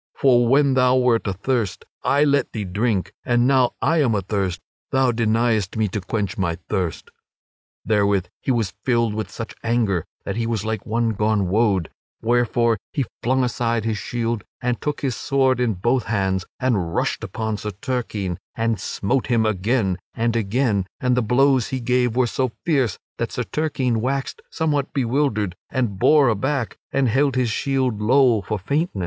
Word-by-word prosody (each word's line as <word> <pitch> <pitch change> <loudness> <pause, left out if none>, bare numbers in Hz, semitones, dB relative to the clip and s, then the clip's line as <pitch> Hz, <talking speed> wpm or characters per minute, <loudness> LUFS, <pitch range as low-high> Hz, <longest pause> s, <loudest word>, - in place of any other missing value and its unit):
For 120 -3 +4
when 140 +2 +4
thou 125 -1 +4
wert 125 -4 +2
athirst, 100 +2 -1 0.2
I 145 +1 +3
let 140 -2 +1
thee 110 - -3
drink; 100 +1 -1
and 120 -1 +2
now 130 -2 +3
that - - -2
I 165 -1 +3
am 120 -6 +2
athirst, 95 -2 -1 0.3
thou 130 -1 +3
deniest 115 -3 +1
me 110 -1 +2
to 105 +2 -3
quench 105 +2 -3
my 85 -3 0
thirst." 90 -5 -2 0.7
Therewith 100 -3 +2 0.2
he - - -4
was 115 -6 +1
filled 115 -4 +1
with 110 0 -3
such 115 - -7
anger 115 -7 +1 0.2
that - - -3
he 115 -1 -1
was 110 -3 -2
like 110 +2 -3
one 115 +1 +1
gone 105 -2 +1
wode; 100 -4 +1 0.3
wherefore 120 -1 +2
he 140 - -1 0.2
flung 130 +2 +2
aside 115 -2 -1
his 110 -2 -1
shield 115 -2 -2 0.2
and 125 -1 -2
took 150 -1 -2
his 130 -4 -1
sword 130 -2 +1
in 120 -4 +1
both 120 +7 +1
hands 95 -3 0
and 105 -11 0
rushed - - -1
upon 110 -1 -3
Sir 105 - -4
Turquine 105 -4 -3 0.2
and 115 -1 0
smote 125 +6 -1
him 115 -3 +2
again 100 -2 0 0.2
and 115 0 0
again; 110 -2 +1
and 125 -1 +2
the 125 - +2
blows 130 +2 +3
he 130 - -3
gave 125 -1 +1
were 130 0 +3
so 125 +1 -1
fierce 135 - +1 0.2
that - - -2
Sir - - -2
Turquine 130 -7 -1
waxed 135 +2 -2
somewhat 145 -3 -1
bewildered 120 -7 0
and 120 -8 -1
bore 150 +2 +5
aback, 120 +3 -1
and 135 -1 +2
held 135 +3 +2
his 125 -3 +1
shield 130 -4 0
low 120 -1 +4
for 105 +3 -3
faintness. 140 - -1
115 Hz, 175 wpm, -22 LUFS, 105-130 Hz, 0.7 s, bore